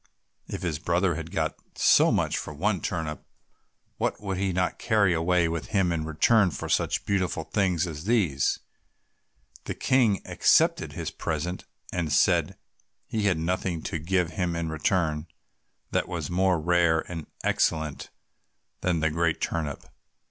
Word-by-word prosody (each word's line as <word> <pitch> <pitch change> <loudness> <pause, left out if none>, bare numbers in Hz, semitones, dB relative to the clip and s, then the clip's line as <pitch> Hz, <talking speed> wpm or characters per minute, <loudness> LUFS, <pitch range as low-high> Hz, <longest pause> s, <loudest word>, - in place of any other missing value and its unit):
If - - -6
his 80 -4 -2
brother 90 +2 +1
had 80 +1 -6
got 80 -3 -1 0.2
so - - +5
much - - +1
for 75 - -5
one 95 +4 0
turnip, 80 -4 -3 0.8
what - - -1
would 95 -2 -3
he 95 0 0
not 90 0 -1
carry 105 -5 +3
away 85 +1 +2
with 80 -1 -3
him 95 -5 +1
in 80 -2 -1
return 95 +6 +3
for 70 - -5
such - - 0
beautiful 95 -5 0
things 90 -3 +1
as 80 -1 -7
these? 95 - +2 1.1
The - - -4
King 120 -7 +2
accepted - - +3
his - - -4
present, 85 +3 -3 0.3
and 85 -4 -1
said 70 - +3 0.5
he 110 -2 -2
had 95 -5 +3
nothing 85 0 -2
to 80 - -3
give 90 +1 0
him 85 +1 -1
in 85 -1 -2
return 80 0 0 0.6
that - - 0
was 85 -3 -4
more 90 -1 +2
rare 85 0 +3
and 80 -4 -7 0.2
excellent 80 -2 0 0.7
than 85 -3 0
the 80 -1 +2
great 85 0 0
turnip. 75 -4 -3
85 Hz, 150 wpm, -27 LUFS, 80-95 Hz, 1.1 s, so